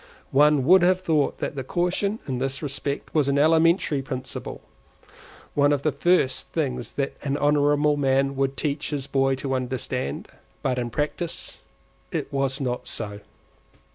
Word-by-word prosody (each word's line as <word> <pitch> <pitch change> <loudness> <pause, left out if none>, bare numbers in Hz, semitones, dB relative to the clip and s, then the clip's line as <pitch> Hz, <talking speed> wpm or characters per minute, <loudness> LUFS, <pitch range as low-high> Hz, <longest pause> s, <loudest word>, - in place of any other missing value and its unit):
One 145 -1 +4
would 185 +4 +7
have 185 +1 +3
thought 155 -5 +1
that 135 -2 -4
caution 180 +6 0
in 130 -3 -2
this 135 +3 -2
respect 140 0 -4
was 150 -3 +2
an 140 0 +2
elementary 160 -1 +3
principle,—one 135 +2 -5
of 140 -1 0
the 155 - +2
first 140 -2 +1
things 130 -7 -3
that 140 -1 -2
an 140 0 -1
honourable 145 0 +3
man 135 0 +2
would 135 0 -1
teach 145 -1 -2
his 145 -3 -3
boy 135 -1 +1
to 135 0 -3
understand; 125 - -3 0.4
but 125 -2 0
in 120 -1 -2
practice 150 +6 -3 0.5
it - - -3
was 135 0 0
not 125 -3 -3
so. 105 -2 -4
140 Hz, 145 wpm, -24 LUFS, 135-150 Hz, 0.5 s, would